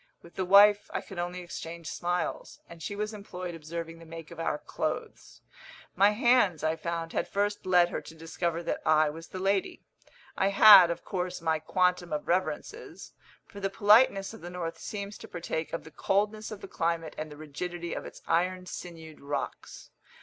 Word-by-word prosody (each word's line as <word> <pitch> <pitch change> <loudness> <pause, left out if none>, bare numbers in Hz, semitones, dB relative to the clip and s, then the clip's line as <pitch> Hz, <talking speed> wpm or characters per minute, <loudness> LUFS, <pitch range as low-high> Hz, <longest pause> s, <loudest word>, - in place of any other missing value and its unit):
With 170 - -15
the 190 - -2
wife 205 +2 +6
I - - +1
could 190 -3 -9
only 175 +1 -3
exchange 170 -1 -8
smiles, 175 +1 -3
and 170 -1 -12
she 205 - -4
was 210 +1 -3
employed 185 -4 -7
observing 165 +1 -7
the 165 - -13
make 165 -1 -9
of - - -10
our 165 - -1
clothes. 300 - -5 0.5
My 200 +2 +6
hands, 210 - +3
I 160 0 +1
found, 165 0 -4
had - - -1
first 205 -1 -1
led 175 -1 +5
her - - -4
to 160 - -12
discover 165 +1 -3
that - - -2
I 155 -1 +4
was 165 +2 -10
the - - -8
lady. 195 +1 -1 0.5
I 190 - +2
had, 200 -2 +9
of 170 - -4
course, 180 -1 -3
my 160 -2 0
quantum 180 +2 +1
of 150 -1 -3
reverences; 185 - -3 0.3
for 200 - -11
the 195 0 -1
politeness 210 0 +4
of 225 - -11
the 175 - -7
north 175 -2 -5
seems 200 0 -6
to - - -10
partake 165 -2 -4
of 165 - -4
the 160 - -13
coldness 210 +4 0
of 210 -2 -8
the - - -8
climate 165 -3 -2
and 155 0 -6
the 150 - -10
rigidity 170 +3 -5
of - - -4
its - - -11
iron 180 +2 0
sinewed 165 -4 -9
rocks. 140 +1 -5
175 Hz, 190 wpm, -29 LUFS, 165-195 Hz, 0.5 s, had